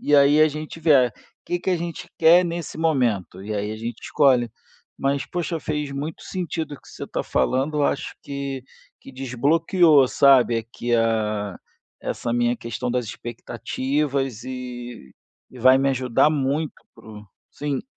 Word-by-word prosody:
E, 145 0 +3
aí, 145 +2 +6
a 155 - +6
gente 155 +2 -7
vê, 155 -2 +5
ah: 125 -3 +3 0.3
"Que, 175 0 -2
que 190 - -1
a 180 - +2
gente 170 +1 -6
quer 170 +2 +7
nesse 170 -2 -4
momento?". 120 - 0
E, 105 +1 -4
aí, 105 0 -2
a 110 - -5
gente 115 +1 -6
escolhe. 125 -5 +3 0.5
Mas, 140 0 0
poxa, 175 -1 -3
fez 150 -2 -3
muito 145 +3 -5
sentido 170 -4 -4
o - - -10
que - - -19
você - - -8
tá - - -3
falando. 140 +4 0
Eu 145 - +3
acho 150 - -2
que 140 -2 -5 0.4
que - - -12
desbloqueou, 145 +4 +3
sabe, 130 -4 +5
aqui, 120 +1 -2
ah, 110 -3 0 0.4
essa 115 - -3
minha 120 0 +1
questão 115 +2 -4
das 125 0 0
expectativas, 130 +3 -3
eh, 130 - -7 1.0
e 130 - -13
vai 130 +2 +6
me 135 +1 +2
ajudar 130 +2 +2
muito 145 +1 -1 0.2
pro 105 -1 -12 0.2
sim. 145 -2 -3
135 Hz, 165 wpm, -23 LUFS, 120-155 Hz, 1.0 s, quer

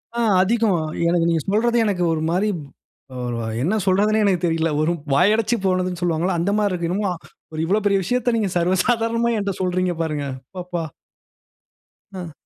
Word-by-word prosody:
ஆ - - -1 0.2
அதிகம். 215 -2 +2 0.3
எனக்கு 170 -1 +2
நீங்க 165 -2 +1
சொல்றது 235 +3 +2
எனக்கு 185 -4 0
ஒரு 155 - -2
மாரி 200 +4 +1 0.7
அ - - -6 0.5
என்ன 185 +7 +1
சொல்றதுன்னே 210 +3 +3
எனக்குத் 185 -3 +2
தெரியல. 165 0 0
ஒரு 160 +2 +2 0.2
வாயடச்சுப் 215 - +2
போனதுன்னு 185 -1 0
சொல்லுவாங்கல்ல, 175 +1 0
அந்த 180 +4 0
மாரி 205 -2 +1
இருக்கு. 175 -2 -2
என்னமோ 195 +1 0 0.4
ஒரு 155 - -5
இவ்ளோ 200 +6 +2
பெரிய 200 -1 +3
விஷயத்த 245 +4 0
நீங்க 210 -4 0
சர்வ 175 +2 +2
சாதாரணமா 230 0 +1
என்ட்ட 200 -1 -1
சொல்றீங்க 185 0 0
பாருங்க. 150 -3 -2 0.3
அப்பப்பா! 180 -2 -4 1.3
ம். 175 -4 -6
185 Hz, 160 wpm, -21 LUFS, 175-215 Hz, 1.3 s, சொல்றதுன்னே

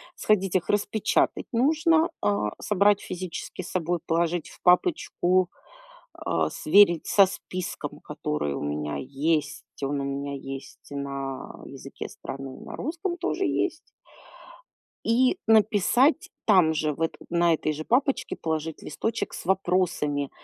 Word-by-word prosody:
Сходить 195 -3 +1
их 180 - +1
распечатать 205 +1 +1
нужно, 315 +6 +3
а, 105 +1 +1
собрать 205 0 +3
физически 185 0 -6
с - - -8
собой, 175 -1 0
положить 170 0 0
в - - -17
папочку, 185 - +3 0.7
а, - - 0
сверить 175 0 +4
со 200 -2 +6
списком, 185 -1 -6
который 75 -1 -3
у - - -4
меня 75 0 -2
есть. 145 +3 -1 0.2
Он 140 +1 -1
у - - -2
меня 140 +1 -3
есть 135 0 -8
на 140 -1 -5
языке - - -8
страны, 135 -1 -8
на - - -8
русском 345 +5 -3
тоже - - -1
есть. - - -1 1.2
И 250 +8 +3
написать 225 - +4 0.2
там 180 -7 +5
же, 155 -1 0
в 155 - -10
это 165 - -1
на 170 0 +3
этой 155 -1 -1
же 155 +1 -5
папочке 255 +1 +1
положить 160 -1 -3
листочек 225 +9 -3
с - - -7
вопросами 175 -7 +1
175 Hz, 130 wpm, -26 LUFS, 145-210 Hz, 1.2 s, со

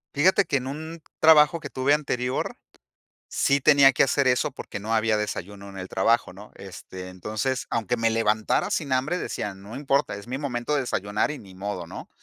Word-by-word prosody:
Fíjate 185 +7 +4
que - - -1
en 130 -1 -1
un 160 +3 -7 0.2
trabajo 155 +1 +6
que 145 - -8
tuve 130 +2 +1
anterior, 125 -4 -1 0.7
sí 140 +1 +1
tenía 140 -1 +7
que - - +4
hacer 140 0 +2
eso 125 -1 +2
porque 105 - -7
no 110 +3 -3
había 110 -1 +2
desayuno 100 -1 -5
en 95 -1 -9
el 90 - -6
trabajo, 115 +1 +1
¿no? 105 +3 -13
Este, 95 -1 -9
entonces, 110 +7 -3
aunque 115 +1 -1
me 115 0 +2
levantara 110 -1 +1
sin 140 -4 -1
hambre, 135 +8 0
decía: 105 - -4
"No 100 +4 -11
importa, 140 0 0
es 100 +3 -10
mi 130 - -3
momento 135 0 -2
de 140 - +1
desayunar 105 +2 -1
y 150 - -7
ni 95 -2 -14
modo", 95 -2 -5
¿no? - - -9
120 Hz, 195 wpm, -25 LUFS, 105-140 Hz, 0.7 s, tenía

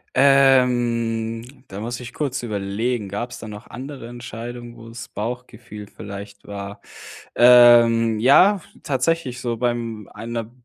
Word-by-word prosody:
Ähm, 120 -4 +3 0.2
da 95 - -8
muss 120 +3 -5
ich 125 0 -9
kurz 140 -3 -3
überlegen. 105 +1 -3
Gab 120 +5 -4
es - - -9
da - - -9
noch 105 +2 -10
andere 130 -1 -8
Entscheidungen, 120 0 -8
wo 115 0 -12
das 115 +1 -9
Bauchgefühl 115 -2 -7
vielleicht 100 0 -10
war? 100 0 -7 0.5
Ähm, 120 -2 +6
ja, 180 - +5 0.2
tatsächlich 135 -1 -1
so 120 -1 -3
beim 115 -3 -3
einer 115 0 -6
120 Hz, 130 wpm, -21 LUFS, 110-125 Hz, 0.5 s, Ähm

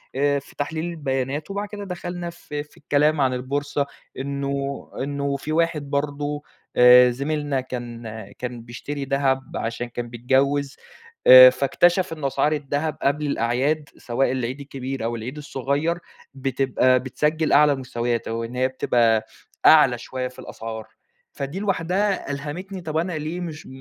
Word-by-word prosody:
آآ 140 +1 +2
في 135 - -17
تحليل 155 +3 -3
البيانات 145 -1 -3
وبعد 200 +1 -3
كده 205 0 -7
دخلنا 175 -1 -5
في 150 -4 -6
في 150 - -23
الكلام 150 +1 +2
عن 130 -1 +2
البورصة 140 +3 -1 0.3
إنه 140 0 -3 0.2
إنه 140 0 -2
في 150 - -6
واحد 155 -3 0
برضه 145 +1 -2 0.3
آآ 125 0 +8
زميلنا 140 +1 -1
كان 120 -2 -7 0.3
كان 125 -1 -5
بيشتري 135 +4 -6
دهب 135 -1 0
عشان 115 +2 -3
كان 120 0 -5
بيتجوِّز. 135 +4 +1 0.5
آآ 130 0 +12
فاكتشف 170 +8 +2
إنه 155 -3 -2
أسعار 135 +3 +1
الدهب 145 +1 -2
قبل 145 +2 +1
الأعياد، 140 +4 0
سواء 125 +2 0
العيد 130 +1 -2
الكبير 135 -2 -5
أو 115 +1 -1
العيد 125 +6 -6
الصغير 145 +3 -1 0.4
بتبقى 130 -1 +2
بتسجل 150 +5 0
أعلى 150 +1 +6
المستويات، 120 -3 -2
أو 115 +1 -2
إن 115 +2 -6
هي 130 +1 +2
بتبقى 120 -4 +2 0.4
أعلى 150 -6 +7
شوية 125 +2 -4
في 125 - -13
الأسعار. 110 -1 -7 0.4
فدي 140 +6 -5
لوحدها 195 -2 0
ألهمتني، 175 +7 -5
طب 160 -2 -3
أنا 175 +2 -1
ليه 155 +3 -3
مش 160 -3 -7
140 Hz, 145 wpm, -23 LUFS, 130-150 Hz, 0.5 s, آآ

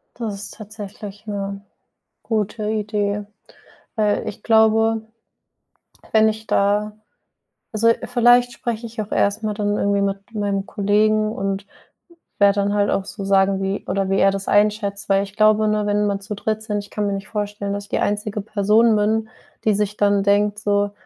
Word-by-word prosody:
Das 225 -3 -4
ist 200 - -8
tatsächlich 210 -1 -9
'ne 200 -1 -4 0.6
gute 215 -1 -2
Idee. 210 -1 -1 0.7
Weil 210 -2 +1
ich 205 - -8
glaube, 225 0 +3 1.1
wenn 220 0 +5
ich 220 0 -4
da 205 +1 +1 0.8
also 225 +1 +2 0.2
vielleicht 245 0 +4
spreche 235 -1 -4
ich 225 -1 -5
auch 210 - -10
erst 205 +2 +1
mal 215 - -1
dann 205 0 -1
irgendwie 200 0 +1
mit 200 +3 -3
meinem 200 -2 -1
Kollegen 215 +1 +2
und 195 -1 -3 0.7
werde 200 -1 +5
dann 200 0 0
halt 205 -1 +2
auch 195 - 0
so 200 -2 -7
sagen, 195 0 +3
wie 195 +1 -2
oder 195 +1 0
wie 195 - +2
er 195 - +5
das 195 0 -5
einschätzt, 205 0 +1
weil 195 0 +3
ich 195 0 -13
glaube, 215 0 +4
ne, 210 0 +1
wenn 205 0 +1
man 200 -1 -1
zu 205 +1 -6
dritt 215 +1 -2
sind, 210 -2 -2
ich 200 - -12
kann 210 -1 -2
mir 200 - -1
nicht 195 +1 -6
vorstellen, 205 -1 -3
dass 205 - -5
ich - - -18
die - - 0
einzige 210 0 -1
Person 215 +2 +3
bin, 220 +1 +1 0.4
die 215 -2 +3
sich 210 0 -1
dann 200 -1 +3
denkt 205 +1 +2
so: 205 -1 0
205 Hz, 175 wpm, -21 LUFS, 200-215 Hz, 1.1 s, wenn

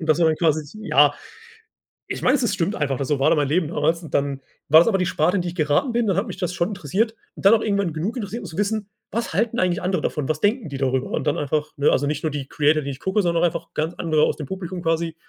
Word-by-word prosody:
Und 160 - -5
dass 155 - +4
man 165 - +4
dann 155 - +1
quasi 155 -3 +1 0.2
ja, 145 -7 +4 0.9
ich - - -5
weiß, 255 0 +3
es 230 - +1
stimmt 180 +5 -1
einfach, 140 -3 -1
so 145 -1 0
war 135 - +4
da - - +4
mein 145 -2 +1
Leben 155 +2 +1
damals. 160 +2 0
Dann 140 -1 -1 0.3
war 155 +2 +8
das - - +2
aber 200 - +3
die 180 - 0
Sparte, 175 +3 +1
in - - +1
die 175 - -3
ich 175 - -9
geraten 155 - +1
bin. 235 -1 0
Dann 195 - +1
hat - - 0
mich - - -7
das 180 -1 -2
schon 170 +2 0
interessiert 205 - -1 0.2
und - - -11
dann 205 - +8
auch 225 - +4
irgendwann 200 -6 0
genug 190 +11 -3
interessiert, 220 +1 -4
um - - -8
zu 160 - -10
wissen, 205 0 -1 0.2
was 230 -6 -3
halten 230 +5 0
eigentlich 180 -2 +1
andere 180 -3 0
davon? 150 -1 -2
Was 155 0 0
denken 210 - 0
die 140 - -5
darüber? 130 -1 0
Und - - -2
dann 145 - +1
einfach, 150 +1 -1
ne, 145 - +3
also 145 - +1
nicht 150 +1 -2
nur 155 - 0
die 140 -2 -5
Creator, 150 +1 +2
die 140 - -4
ich 135 - -9
gucke, 190 +2 +1
sondern 170 -2 +1
auch - - +6
einfach 165 - -6
ganz 160 +3 -2
andere 155 -2 +1
aus - - +2
dem 150 - -5
Publikum 185 0 -5
quasi. 165 0 0
165 Hz, 285 wpm, -22 LUFS, 150-195 Hz, 0.9 s, war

